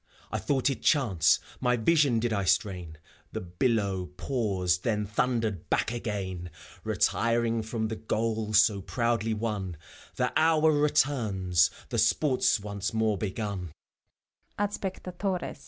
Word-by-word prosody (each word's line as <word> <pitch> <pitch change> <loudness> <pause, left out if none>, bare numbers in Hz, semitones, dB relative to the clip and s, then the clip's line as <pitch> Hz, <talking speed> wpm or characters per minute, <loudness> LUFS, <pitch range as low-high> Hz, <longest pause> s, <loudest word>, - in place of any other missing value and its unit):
I - - -1
thought 140 -1 +1
it 125 - -5
chance, 100 - +3 0.2
my 125 -1 +2
vision 140 0 +3
did 115 0 0
I 100 -2 0
strain; 90 -2 0 0.4
The - - -2
billow 95 0 0
paused, 95 -8 0
then 105 -2 0
thundered 110 -3 -1
back - - +1
again, 95 -6 -4 0.3
Retiring 115 -1 +1
from 110 0 -2
the 110 0 -4
goal 110 -1 -2
so 105 -2 +5
proudly 115 +1 0
won: 105 -6 -3 0.4
The - - 0
hour 160 -1 +4
returns, 110 - +2 0.2
the 120 -3 -1
sport's 125 +2 +3
once 100 +1 -4
more 110 -1 +2
begun. 100 -4 -4
110 Hz, 120 wpm, -28 LUFS, 95-120 Hz, 0.4 s, so